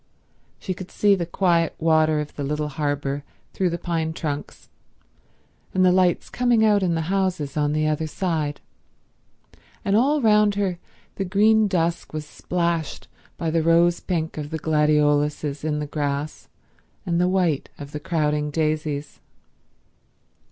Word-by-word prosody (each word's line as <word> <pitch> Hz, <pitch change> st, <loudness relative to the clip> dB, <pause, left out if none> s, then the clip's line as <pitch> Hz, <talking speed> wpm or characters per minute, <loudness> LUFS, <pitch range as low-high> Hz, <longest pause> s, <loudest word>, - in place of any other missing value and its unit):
She 185 Hz, -, -4 dB
could 185 Hz, 0 st, -9 dB
see 205 Hz, -1 st, +3 dB
the 175 Hz, -4 st, -1 dB
quiet 170 Hz, -2 st, +1 dB
water 155 Hz, -1 st, +3 dB
of 150 Hz, 0 st, -5 dB
the 145 Hz, -, -4 dB
little 150 Hz, +1 st, -2 dB
harbour 145 Hz, -1 st, -2 dB, 0.3 s
through 185 Hz, -2 st, +1 dB
the 170 Hz, -, -2 dB
pine 165 Hz, -2 st, -2 dB
trunks, 150 Hz, -3 st, -5 dB, 1.1 s
and 185 Hz, 0 st, +4 dB
the 180 Hz, -, +6 dB
lights 180 Hz, -2 st, +2 dB
coming 240 Hz, -3 st, +2 dB
out 205 Hz, -2 st, +4 dB
in 175 Hz, -3 st, +1 dB
the 160 Hz, -, 0 dB
houses 185 Hz, -8 st, -1 dB
on 145 Hz, -1 st, +1 dB
the 155 Hz, 0 st, 0 dB
other 155 Hz, +1 st, 0 dB
side, 155 Hz, -4 st, -2 dB, 1.2 s
and 200 Hz, -, +2 dB
all 280 Hz, +7 st, +3 dB
round 210 Hz, -4 st, +4 dB
her 190 Hz, -4 st, -1 dB, 0.4 s
the 195 Hz, -, -1 dB
green 215 Hz, +3 st, +4 dB
dusk 170 Hz, -4 st, -1 dB
was 155 Hz, -1 st, -4 dB
splashed 170 Hz, 0 st, -2 dB, 0.3 s
by 165 Hz, -2 st, -2 dB
the 165 Hz, 0 st, +2 dB
rose 170 Hz, +1 st, +4 dB
pink 160 Hz, -3 st, -3 dB
of 145 Hz, -1 st, -5 dB
the 160 Hz, -, -3 dB
gladioluses 150 Hz, -1 st, +1 dB
in 155 Hz, -1 st, -1 dB
the 150 Hz, -, -2 dB
grass 145 Hz, 0 st, -3 dB, 0.6 s
and 170 Hz, -1 st, +1 dB
the 180 Hz, -, +3 dB
white 180 Hz, -6 st, +1 dB
of 145 Hz, -1 st, -9 dB
the 150 Hz, -, -5 dB
crowding 150 Hz, -2 st, 0 dB
daisies. 155 Hz, -1 st, -2 dB
160 Hz, 150 wpm, -23 LUFS, 150-185 Hz, 1.2 s, the